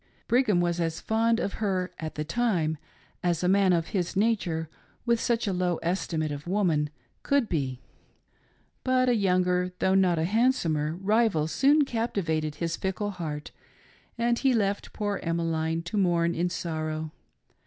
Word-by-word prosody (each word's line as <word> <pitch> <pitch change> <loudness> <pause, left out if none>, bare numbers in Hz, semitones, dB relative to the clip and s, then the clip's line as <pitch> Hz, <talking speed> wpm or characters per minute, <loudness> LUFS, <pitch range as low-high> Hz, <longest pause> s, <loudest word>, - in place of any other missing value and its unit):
Brigham 235 -7 +3
was 175 0 0
as 165 -1 -1
fond 225 +1 +1
of 200 - -2
her, 185 -3 0
at 160 -1 -5
the 150 - -2
time, 165 -5 0 0.4
as 175 -1 0
a - - +2
man 195 0 +4
of 165 -2 +1
his 180 -4 -2
nature, 190 -6 0 0.4
with 235 -1 +2
such 235 -1 0
a 200 - 0
low 180 -2 0
estimate 165 -3 -1
of 145 +2 -6
woman, 170 -6 +1 0.3
could 280 -4 +2
be. 130 -7 -2 1.0
But 255 -1 +2
a 245 - +3
younger, 180 -2 +1
though 190 - +2
not 185 -3 +3
a 160 - +1
handsomer, 170 - +1
rival 195 -3 +2
soon 280 - +3
captivated 165 - -1
hie 170 - -3
fickle 190 +5 -2
heart, 155 -5 -5 0.7
and 235 0 +1
he 265 -3 +3
left 200 -2 -1
poor 205 -2 -2
Emmeline 165 -1 -1
to 175 +5 -4
mourn 170 -2 +2
in 175 +2 0
sorrow. 155 -2 -3
180 Hz, 155 wpm, -27 LUFS, 160-215 Hz, 1.0 s, man